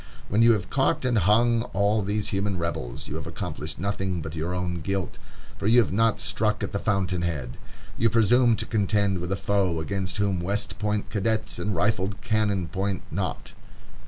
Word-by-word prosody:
When 105 +3 +2
you 115 0 +7
have 100 -5 -3
caught 135 -1 +1
and 120 -3 +3
hung 115 +5 +4
all 100 +2 +2
these 105 +1 -1
human 100 -1 -1
rebels, 85 -8 -4
you - - -4
have - - -7
accomplished - - -5
nothing 95 -1 -2
but 80 0 -6
your 80 +2 -2
own 90 -1 -2
guilt, 95 +1 -3 0.4
for 100 - -1
you 115 +3 +5
have 115 - +2
not 115 +2 +2
struck 105 +5 0
at - - -3
the 100 - -2
fountain 95 -4 0
head. 75 -8 -3 0.4
You 115 - +4
presume 115 +1 +4
to 110 - -2
contend 100 -3 +1
with 90 +1 -4
a - - +2
foe 100 -4 0
against 95 +4 -3
whom 100 -3 +1
West 100 +4 -2
Point 105 0 -1
cadets 110 +1 -1
and 105 -1 -1
rifled 100 +1 0
cannon 105 -5 0
point 95 +1 -2
not. 90 0 -3
100 Hz, 190 wpm, -26 LUFS, 90-110 Hz, 0.4 s, you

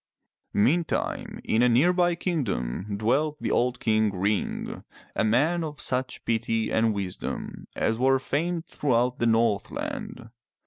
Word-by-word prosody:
Meantime, 150 +11 0
in 110 - +2
a 125 - +5
nearby 175 +8 +3
kingdom 105 - -2
dwelt 145 +8 +1
the - - -2
old 125 +1 +1
King 110 -2 +2
Ring, 100 +2 -2 0.3
a - - +1
man 145 +11 +2
of 150 -3 -6
such 130 0 -2
piety 115 -1 0
and 110 -1 +2
wisdom 95 -3 -5
as 115 +1 0
were 135 +1 +4
famed 165 +5 -2
throughout 125 -2 0
the 120 - +2
Northland. 115 +1 -1
120 Hz, 130 wpm, -26 LUFS, 110-150 Hz, 0.3 s, a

